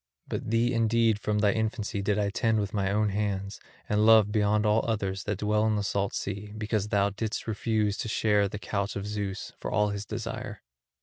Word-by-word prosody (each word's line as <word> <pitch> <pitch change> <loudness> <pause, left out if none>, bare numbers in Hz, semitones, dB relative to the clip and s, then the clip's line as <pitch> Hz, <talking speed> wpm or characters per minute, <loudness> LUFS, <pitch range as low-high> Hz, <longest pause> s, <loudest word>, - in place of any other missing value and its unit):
But - - -4
thee 115 +2 +2
indeed 115 -1 +2
from 105 0 -1
thy 105 0 +3
infancy 110 -2 -2
did 100 +1 0
I 100 -1 0
tend 110 0 +1
with 100 -2 -3
my 100 -2 0
own 105 +1 +2
hands 100 -1 -2 0.3
and 105 0 +2
love 110 -2 +6
beyond 105 0 +2
all 105 +1 +3
others 95 -4 -2
that 105 -2 -1
dwell 105 +1 +1
in 110 - +2
the 105 - -1
salt 100 0 -1
sea 100 +1 -4
because 105 -1 -1
thou 100 -1 +2
didst 110 +2 -3
refuse 110 -1 0
to - - -2
share 105 -2 +2
the 105 - -5
couch 100 0 -3
of 100 - -4
Zeus, 105 -2 -4
for - - -4
all 105 -1 +2
his 100 0 -4
desire. - - -5
105 Hz, 205 wpm, -28 LUFS, 100-110 Hz, 0.3 s, love